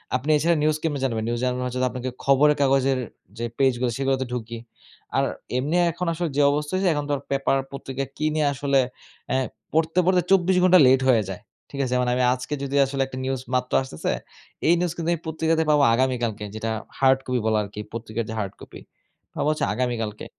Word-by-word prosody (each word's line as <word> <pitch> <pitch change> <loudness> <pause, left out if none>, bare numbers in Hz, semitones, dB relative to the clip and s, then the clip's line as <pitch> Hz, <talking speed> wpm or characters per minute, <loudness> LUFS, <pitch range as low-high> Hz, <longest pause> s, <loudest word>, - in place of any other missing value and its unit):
আপনি 130 +4 -2
এছাড়া 170 +3 +2
নিউজ 155 0 +2
কেমনে 150 -3 -1
জানবেন? 115 -4 -1
নিউজ 120 0 -1
জানবার 125 0 -1
জন্য 130 0 0
আপনাকে 130 0 -4
খবরের 145 +2 +4
কাগজের 135 -1 +3 0.4
যে 120 - -2
পেজ 135 -2 +3
গুলো 125 - +1
সেগুলোতে 135 -1 0
ঢুকি। 115 -1 -4 0.6
আর - - +3 0.3
এমনি 145 +6 -1 0.2
এখন 175 +2 -4
আসলে 170 0 -2
যে - - +5
অবস্থা 150 0 -2
হয়েছে 190 0 +2
এখন 145 -1 -2
তো - - +1 0.2
পেপার 135 0 +1
পত্রিকা 135 0 -5
কিনে 155 0 0
আসলে 140 0 +1 0.5
এ্যা 130 - +1 0.4
পড়তে, 160 +2 +2
পড়তে 180 0 +4
২৪ 190 -1 +4
ঘন্টা 185 0 +7
লেট 130 0 +5
হয়ে 115 -4 +4
যায়। 95 - -6 0.3
ঠিক 140 - -7
আছে? 125 - -2
মানে 125 - +1
আমি 125 - +1
আজকে 125 +3 -5
যদি 140 0 -3
আসলে 135 0 -3
একটা 130 -1 -8
নিউজ 130 -1 -2
মাত্র 125 0 -1
আসতেছে, 130 -12 -3 0.6
এই 170 - +6
নিউজ 175 -1 0
কিন্তু 170 0 -3
আমি 165 - -4
পত্রিকাতে 160 0 +1
পাবো 150 -1 +4
আগামীকালকে 120 -4 0
যেটা 110 +1 -3 0.3
হার্ড 135 0 +4
কপি 125 -1 0
বলা 110 -1 +2
আরকি, 105 +1 -9
পত্রিকার 115 0 -4
যে - - -4
হার্ড 100 -2 -3
কপি, - - -11 0.6
পাবো - - -1
হচ্ছে 155 - 0
আগামীকালকে। 115 -4 -2
135 Hz, 195 wpm, -24 LUFS, 125-150 Hz, 0.6 s, ঘন্টা